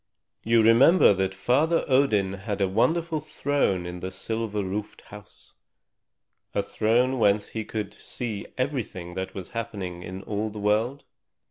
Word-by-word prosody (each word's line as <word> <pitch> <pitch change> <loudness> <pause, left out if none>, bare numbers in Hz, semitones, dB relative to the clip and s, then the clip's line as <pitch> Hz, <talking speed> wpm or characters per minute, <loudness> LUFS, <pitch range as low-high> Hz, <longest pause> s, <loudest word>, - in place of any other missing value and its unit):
You 115 0 +4
remember 115 - +6
that 95 0 0
Father 150 - +2
Odin 110 -8 +3
had 100 +1 -4
a 100 - +2
wonderful 160 - +1
throne 145 - 0
in 90 0 -6
the 95 - -4
silver 110 +1 -3
roofed 100 +2 -5
house, 105 0 -15 1.0
a - - +1
throne 125 +4 +1
whence 100 -1 +2
he 110 - -4
could 110 0 -5
see 115 -5 -6
everything 120 -10 -3
that 95 +1 -5
was 95 -3 -7
happening 100 -7 -5
in 95 +2 -7
all 105 +1 -2
the 105 - -10
world? 110 +6 0
110 Hz, 145 wpm, -26 LUFS, 95-125 Hz, 1.0 s, remember